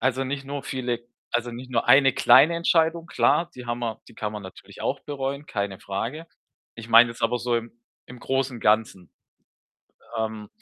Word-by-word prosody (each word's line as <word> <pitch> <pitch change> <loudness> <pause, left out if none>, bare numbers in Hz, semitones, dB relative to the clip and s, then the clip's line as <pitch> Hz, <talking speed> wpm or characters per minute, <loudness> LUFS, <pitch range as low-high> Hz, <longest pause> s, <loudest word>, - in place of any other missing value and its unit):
Also, 130 +1 0
nicht 135 +1 -4
nur 140 0 -5
viele 125 -3 -3 0.3
also, 120 0 -1
nicht 125 +2 -9
nur 115 -2 0
eine 135 -1 +6
kleine 170 +3 +6
Entscheidung, 165 0 +2
klar, 170 0 +2
die 125 -1 -10
haben 120 0 -3
wir 115 -2 -4
die - - -17
kann 105 -1 -4
man 105 -1 -6
natürlich 95 -1 -12
auch - - -2
bereuen, 140 0 -4
keine 100 -3 -3
Frage. 115 +10 -5 0.5
Ich 115 0 -10
meine 115 +1 +7
jetzt 115 0 -11
aber 115 +2 +1
so 120 0 -1
im 115 0 -5 0.3
im 125 - -11
Großen, 135 0 -2
Ganzen. 105 -5 +1 1.1
Ähm 110 -1 -3
120 Hz, 180 wpm, -25 LUFS, 115-135 Hz, 1.1 s, meine